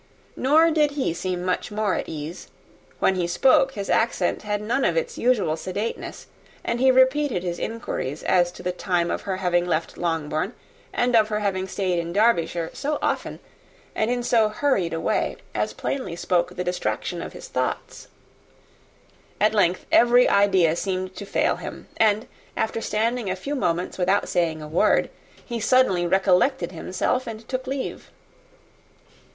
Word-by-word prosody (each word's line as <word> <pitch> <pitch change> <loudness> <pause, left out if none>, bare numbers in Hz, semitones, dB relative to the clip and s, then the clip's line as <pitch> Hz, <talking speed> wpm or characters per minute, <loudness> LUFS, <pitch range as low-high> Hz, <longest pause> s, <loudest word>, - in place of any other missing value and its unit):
Nor 315 +5 +4
did 305 -2 +3
he 260 - 0
seem 180 +1 -3
much 180 - -1
more 210 -2 0
at - - -3
ease; 155 +3 -6 0.5
when - - +3
he 180 -2 -1
spoke, 265 +8 +4
his 200 -1 -5
accent 230 - +1
had 210 -1 -2
none 230 +6 -1
of - - +1
its 485 -1 -1
usual 225 -11 +2
sedateness; 190 +7 -5 0.4
and 235 - -1
he 260 +1 +5
repeated 260 -5 +3
his 175 -1 -3
inquiries 220 - -4
as 175 -1 +3
to - - -11
the 180 - 0
time 180 -1 -1
of - - -2
her 190 -2 -3
having 175 -2 +1
left 165 -2 -2
Longbourn, 165 +3 -1 0.4
and 245 0 +1
of 220 -2 +5
her 200 -3 -1
stay 185 -2 -1
in 170 0 -4
Derbyshire, 175 -6 +2
so 295 +1 -2
often, - - -2 0.5
and 220 - 0
in 245 0 -1
so 230 -3 +3
hurried 215 - 0
a 165 - -2
way, - - 0 0.2
as - - -1
plainly 255 -11 -4
spoke 175 0 0
the 180 - -2
distraction 180 0 -2
of - - -7
his - - -9
thoughts. - - -3 1.3
At 215 +1 +3
length, 185 -4 +2
every 240 +1 +6
idea 190 -5 +4
seemed 185 0 -3
to 200 - -7
fail - - +1
him; - - -8
and 215 0 +3 0.3
after 225 +1 -1
standing 225 0 -1
a 185 - -1
few 275 +10 -5
moments 180 -8 -1
without 190 +3 +2
saying 160 -3 0
a - - -7
word, 160 +3 +2 0.3
he 235 -1 -4
suddenly 210 -7 +3
recollected 190 +7 +2
himself, 185 +9 -2
and 225 -1 -7
took 255 0 -4
leave. 270 0 -4
200 Hz, 165 wpm, -24 LUFS, 175-240 Hz, 1.3 s, every